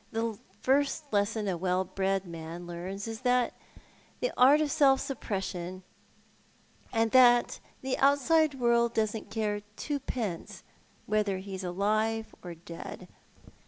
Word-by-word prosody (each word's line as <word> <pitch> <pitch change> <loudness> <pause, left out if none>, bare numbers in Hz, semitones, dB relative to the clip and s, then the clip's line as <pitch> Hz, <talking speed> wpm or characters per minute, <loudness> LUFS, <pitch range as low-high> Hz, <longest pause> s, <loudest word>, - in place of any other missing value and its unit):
The 225 -1 -2 0.2
first 285 +1 +1
lesson 205 +1 +1
a 190 - 0
well 180 +1 0
bred 195 +1 -1
man 170 0 -7
learns 185 +4 -6
is 225 +1 -6
the 250 -1 +2 0.8
art 270 +4 +6
of 305 -2 0
self 270 -2 +5
suppression, 190 -7 -4 1.1
and 225 -1 +1
that 245 -2 +5 0.2
the 260 0 -1
outside 285 +2 +4
world 235 -1 +2
doesn't 215 -1 -1
care 210 -1 -1 0.2
twopence 245 - -4 0.4
whether 210 -2 +1
he's 190 0 -6
alive 215 +5 0
or 175 -1 -8
dead. 165 0 -9
215 Hz, 120 wpm, -29 LUFS, 190-250 Hz, 1.1 s, art